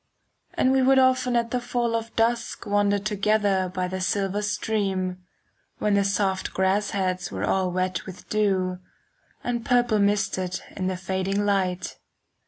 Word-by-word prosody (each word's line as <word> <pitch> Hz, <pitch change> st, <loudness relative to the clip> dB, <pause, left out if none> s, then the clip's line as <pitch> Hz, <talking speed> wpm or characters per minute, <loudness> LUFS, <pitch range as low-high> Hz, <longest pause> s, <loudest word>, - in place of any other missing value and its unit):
And 260 Hz, -, +3 dB
we 265 Hz, 0 st, +3 dB
would 265 Hz, +1 st, +5 dB
often 255 Hz, -1 st, +3 dB
at 235 Hz, -1 st, +1 dB
the 250 Hz, -, 0 dB
fall 240 Hz, -1 st, -1 dB
of 230 Hz, 0 st, -4 dB
dusk 230 Hz, +1 st, 0 dB
Wander 205 Hz, 0 st, +2 dB
together 200 Hz, -2 st, +1 dB
by 180 Hz, 0 st, -2 dB
the 185 Hz, +1 st, -4 dB
silver 195 Hz, +1 st, 0 dB
stream, 195 Hz, -3 st, -1 dB, 0.6 s
5 -, -, -48 dB
When 210 Hz, -, +1 dB
the 200 Hz, 0 st, +3 dB
soft 195 Hz, -1 st, -1 dB
grass 190 Hz, +2 st, +1 dB
heads 185 Hz, -2 st, -1 dB
were -, -, -4 dB
all 190 Hz, -1 st, +1 dB
wet 185 Hz, +1 st, -2 dB
with 185 Hz, -1 st, -10 dB
dew, 190 Hz, -4 st, 0 dB, 0.6 s
And 240 Hz, -1 st, -2 dB
purple 240 Hz, -3 st, +2 dB
misted 200 Hz, -2 st, 0 dB, 0.2 s
in 185 Hz, -1 st, -2 dB
the 185 Hz, -1 st, -2 dB
fading 190 Hz, +2 st, -1 dB
light. 185 Hz, -3 st, 0 dB
200 Hz, 160 wpm, -25 LUFS, 185-225 Hz, 0.6 s, would